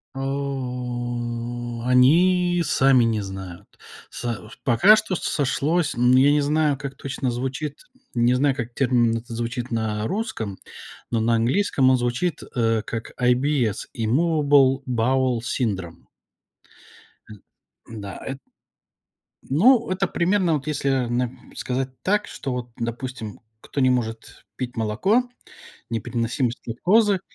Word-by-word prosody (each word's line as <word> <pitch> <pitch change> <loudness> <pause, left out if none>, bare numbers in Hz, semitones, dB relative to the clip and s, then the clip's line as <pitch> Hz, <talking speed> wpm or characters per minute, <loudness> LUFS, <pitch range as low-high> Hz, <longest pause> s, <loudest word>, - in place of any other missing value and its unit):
О, 120 -3 -4
они 175 +7 +4
сами 135 -4 +4
не 110 -2 +1
знают. 95 -3 -8 0.4
Со 115 -2 -5
пока 140 - +6
что 215 -4 -1
сошлось. 150 +2 0
Но 125 +2 +4
я 140 +2 +5
не 150 - +3
знаю, 150 -1 +1
как 140 -1 -6
точно 135 -2 -3
звучит. 135 +4 -4 0.3
Не 120 +1 +3
знаю, 135 0 +2
как 120 -2 -5
термин 120 -3 +2
этот 115 +1 -10
звучит 120 +2 -4
на 110 -2 -1
русском, 195 - -3 0.5
но 115 - 0
на 115 +1 +2
английском 130 - +2
он 130 - +4
звучит, 125 +7 -1
э, 115 -2 +1
как 115 -1 -7
IBS 125 -3 +1
immovable 140 +1 +3
bowel 125 +1 +1
syndrom. 95 - -3 1.2
М, 105 -2 -12 0.6
да, 100 -2 -7
эт 135 0 -5 1.1
Ну, 230 - +4
это 185 0 0
примерно, 180 0 +1
вот, 150 -1 -2
если, 140 -2 -1
э, 130 -3 +1
на 120 0 -1 0.2
сказать 130 +1 -2
так, 210 +2 +1
что 135 - -5
вот, 125 -1 -4
допустим, 120 -2 -5 0.2
кто 140 - -4
не 130 - +4
может 115 -3 -3
пить 125 -1 -5
молоко, 185 - +2 0.7
непереносимость 115 +2 -2
лактозы. 195 - +2
125 Hz, 125 wpm, -23 LUFS, 115-145 Hz, 1.2 s, пока